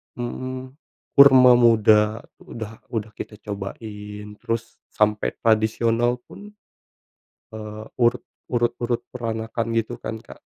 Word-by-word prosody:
Mmm, 130 Hz, +2 st, -5 dB, 0.4 s
kurma 130 Hz, -2 st, +8 dB
muda 110 Hz, -2 st, +4 dB, 0.2 s
udah 110 Hz, -1 st, -8 dB, 0.2 s
udah 110 Hz, 0 st, -3 dB
kita 105 Hz, -, -6 dB
cobain, 105 Hz, 0 st, -7 dB
terus 115 Hz, 0 st, -4 dB
sampai 105 Hz, 0 st, 0 dB
tradisional 115 Hz, +2 st, +2 dB
pun, 210 Hz, +1 st, -13 dB, 1.0 s
eee, 110 Hz, 0 st, -7 dB, 0.2 s
urut 120 Hz, +1 st, +2 dB, 0.3 s
urut 120 Hz, -1 st, +1 dB
urut 120 Hz, 0 st, 0 dB
peranakan 115 Hz, -1 st, -3 dB
gitu 115 Hz, -, -4 dB
kan, 110 Hz, 0 st, -4 dB
Kak. -, -, -15 dB
115 Hz, 110 wpm, -23 LUFS, 105-120 Hz, 1.0 s, kurma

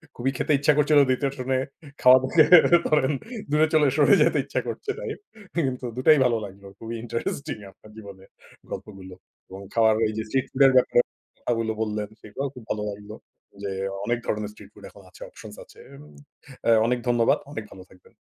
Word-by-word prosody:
খুবই 130 Hz, +2 st, -1 dB
খেতে -, -, -1 dB
ইচ্ছা 150 Hz, +1 st, +3 dB
করছিল। 150 Hz, 0 st, +4 dB
দ্বিতীয়টা 135 Hz, +2 st, -1 dB
শুনে 130 Hz, +1 st, -1 dB, 0.4 s
খাওয়া 125 Hz, 0 st, +8 dB, 0.7 s
ধরেন 150 Hz, -2 st, +2 dB, 0.4 s
দূরে 155 Hz, +1 st, +3 dB
চলে 150 Hz, -2 st, +4 dB
সরে 145 Hz, -2 st, +5 dB
যেতে -, -, +3 dB
ইচ্ছা -, -, -2 dB
করছে 420 Hz, -, -4 dB
তাই। -, -, -5 dB, 0.4 s
কিন্তু 130 Hz, -6 st, -2 dB
দুটাই 145 Hz, +4 st, +5 dB
ভালো 120 Hz, -2 st, +2 dB
লাগলো। 100 Hz, 0 st, -13 dB
খুবই 115 Hz, +1 st, -7 dB
ইন্টারেস্টিং 120 Hz, +3 st, -4 dB
আপনার 105 Hz, +2 st, -19 dB
জীবনে 100 Hz, -3 st, -12 dB, 0.5 s
গল্পগুলো 95 Hz, -3 st, -9 dB, 0.4 s
এবং 95 Hz, +1 st, -10 dB
খাওয়ার 110 Hz, -1 st, +4 dB
ওই 110 Hz, -, +1 dB
যে 110 Hz, -, -2 dB
স্ট্রিট 130 Hz, +4 st, -1 dB
ফুড 130 Hz, -, -3 dB
এর 135 Hz, -, +6 dB
ব্যাপারে 120 Hz, -1 st, +4 dB, 0.4 s
কথাগুলো 115 Hz, -2 st, -2 dB
বললেন। 105 Hz, -1 st, -2 dB
সেগুলোও 135 Hz, +6 st, -5 dB
খুব 125 Hz, -, -11 dB
ভালো 105 Hz, -1 st, -2 dB
লাগলো। 105 Hz, +1 st, -10 dB, 0.5 s
যে 100 Hz, -, -3 dB, 0.3 s
অনেক 120 Hz, 0 st, 0 dB
ধরনের 105 Hz, -1 st, -3 dB
স্ট্রিট -, -, -15 dB
ফুড -, -, -17 dB
এখন -, -, -17 dB
আছে, -, -, -19 dB
অপশনস -, -, -12 dB
আছে। -, -, -20 dB, 0.9 s
আ -, -, +4 dB, 0.2 s
অনেক 125 Hz, 0 st, 0 dB
ধন্যবাদ, 120 Hz, -1 st, +3 dB
অনেক 110 Hz, -, -6 dB
ভালো 95 Hz, -, -12 dB
থাকবেন। 90 Hz, -, -21 dB
120 Hz, 175 wpm, -24 LUFS, 105-140 Hz, 0.9 s, খাওয়া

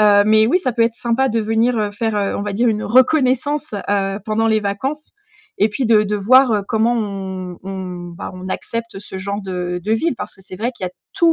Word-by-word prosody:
Heu, 205 Hz, -1 st, +6 dB
mais 215 Hz, 0 st, +5 dB
oui, 310 Hz, +10 st, +3 dB
ça 260 Hz, -, 0 dB
peut 230 Hz, 0 st, +2 dB
être 230 Hz, 0 st, +1 dB
sympa 240 Hz, +3 st, 0 dB
de 230 Hz, -1 st, 0 dB
venir, 225 Hz, +3 st, +1 dB
heu, 210 Hz, -1 st, 0 dB
faire, 220 Hz, +1 st, -2 dB
heu, 200 Hz, -1 st, 0 dB
on -, -, -3 dB
va 205 Hz, 0 st, -3 dB
dire, 235 Hz, +5 st, +2 dB
une 215 Hz, -1 st, 0 dB
reconnaissance, 265 Hz, +2 st, +2 dB, 0.2 s
heu, 195 Hz, -1 st, 0 dB
pendant 220 Hz, +1 st, 0 dB
les 220 Hz, -1 st, +3 dB
vacances 260 Hz, +10 st, -3 dB, 0.5 s
et 210 Hz, -, +5 dB
puis 235 Hz, +4 st, -2 dB
de 215 Hz, -2 st, +5 dB
de 210 Hz, +1 st, -1 dB
voir, 250 Hz, +5 st, +5 dB
heu, 205 Hz, -, 0 dB
comment 225 Hz, +1 st, +2 dB
on 190 Hz, -4 st, -4 dB
on, 180 Hz, -2 st, -6 dB
bah, 205 Hz, -, -6 dB
on 185 Hz, 0 st, -7 dB
accepte 230 Hz, +2 st, -4 dB
ce 190 Hz, -2 st, -8 dB
genre 200 Hz, +2 st, -4 dB
de 180 Hz, -2 st, -3 dB
de 215 Hz, -, 0 dB
vie 310 Hz, +8 st, +1 dB
parce -, -, -6 dB
que 195 Hz, -, -20 dB
c'est 185 Hz, -, -10 dB
vrai 230 Hz, +5 st, -1 dB
qu'il 215 Hz, -, -7 dB
y -, -, -2 dB
a -, -, -30 dB, 0.2 s
tout 340 Hz, -4 st, +4 dB
215 Hz, 245 wpm, -19 LUFS, 195-235 Hz, 0.5 s, Heu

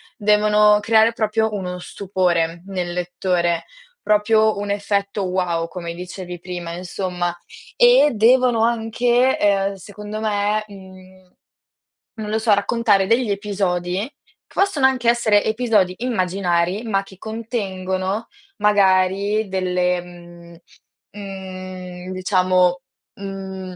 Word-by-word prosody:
devono 210 Hz, 0 st, +4 dB
creare 220 Hz, +1 st, +4 dB
proprio 220 Hz, 0 st, 0 dB
uno 180 Hz, -2 st, -4 dB
stupore 175 Hz, -3 st, -1 dB
nel 180 Hz, -3 st, -3 dB
lettore, 180 Hz, -1 st, -1 dB, 0.4 s
proprio 215 Hz, +1 st, +3 dB
un 205 Hz, 0 st, -4 dB
effetto 200 Hz, 0 st, -1 dB
wow, 180 Hz, -3 st, -1 dB
come 170 Hz, -1 st, -6 dB
dicevi 180 Hz, 0 st, -7 dB
prima, 175 Hz, -1 st, -6 dB
insomma. 180 Hz, 0 st, -3 dB, 0.4 s
E 485 Hz, -11 st, +6 dB
devono 240 Hz, +1 st, +4 dB
anche, 235 Hz, +2 st, +1 dB
ehm, 200 Hz, -1 st, +2 dB
secondo 210 Hz, +3 st, -8 dB
me, 210 Hz, 0 st, 0 dB
mhmm, 185 Hz, -2 st, -15 dB, 0.9 s
non 210 Hz, -, -5 dB
lo 215 Hz, -, 0 dB
so, 220 Hz, -1 st, +3 dB
raccontare 200 Hz, -1 st, +2 dB
degli 230 Hz, 0 st, +2 dB
episodi 190 Hz, -3 st, -1 dB, 0.5 s
che -, -, -22 dB
possono 390 Hz, -9 st, +2 dB
anche 255 Hz, -3 st, +3 dB
essere 220 Hz, -3 st, +3 dB
episodi 220 Hz, -5 st, +1 dB
immaginari, 185 Hz, -4 st, 0 dB
ma 200 Hz, -4 st, 0 dB
che 195 Hz, -1 st, -16 dB
contengono, 200 Hz, -2 st, -3 dB, 0.3 s
magari 200 Hz, +1 st, +2 dB
delle, 180 Hz, -1 st, 0 dB
mhmm, 175 Hz, -1 st, -14 dB, 0.6 s
mhmm, 185 Hz, -2 st, -8 dB
diciamo, 185 Hz, -1 st, +2 dB, 0.4 s
mhmm, 190 Hz, -1 st, -7 dB
195 Hz, 110 wpm, -21 LUFS, 180-215 Hz, 0.9 s, E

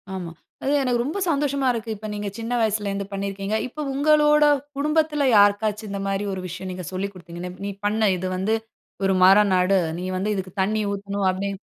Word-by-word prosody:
ஆமா. 175 Hz, -3 st, -5 dB, 0.3 s
அது 275 Hz, -, 0 dB
எனக்கு 245 Hz, -2 st, +1 dB
ரொம்ப 310 Hz, +10 st, -3 dB
சந்தோஷமா 280 Hz, -2 st, +1 dB
இருக்கு. 225 Hz, -1 st, -5 dB
இப்ப 215 Hz, +1 st, -8 dB
நீங்க 205 Hz, 0 st, -4 dB
சின்ன 230 Hz, +2 st, -3 dB
வயசுலருந்து 205 Hz, -2 st, -1 dB
பண்ணியிருக்கிறீங்க. 195 Hz, +1 st, -3 dB
இப்ப 300 Hz, +3 st, -6 dB
உங்களோட 300 Hz, +1 st, +4 dB, 0.3 s
குடும்பத்துல 300 Hz, 0 st, +1 dB
யாருக்காச்சும், 205 Hz, +1 st, +3 dB
இந்த 200 Hz, 0 st, -3 dB
மாரி 195 Hz, +1 st, -1 dB
ஒரு 185 Hz, -, -4 dB
விஷயம் 185 Hz, +2 st, -6 dB
நீங்க 180 Hz, -1 st, -6 dB
சொல்லி 195 Hz, +2 st, -2 dB
குடுத்தீங்கன்னு, 175 Hz, 0 st, -8 dB
"நீ 200 Hz, -, -2 dB
பண்ணு. 215 Hz, +1 st, +2 dB
இது 185 Hz, -, -3 dB
வந்து 215 Hz, +4 st, +1 dB, 0.5 s
ஒரு 195 Hz, -, +3 dB
மரம் 200 Hz, +2 st, +6 dB
நடு. 185 Hz, +2 st, +3 dB, 0.2 s
நீ 180 Hz, -, -4 dB
வந்து 210 Hz, +3 st, 0 dB
இதுக்கு 185 Hz, -1 st, -4 dB
தண்ணீ 215 Hz, +3 st, +1 dB
ஊத்தணும்." 200 Hz, 0 st, -2 dB
அப்பிடி 195 Hz, +2 st, -2 dB
205 Hz, 180 wpm, -23 LUFS, 195-245 Hz, 0.5 s, மரம்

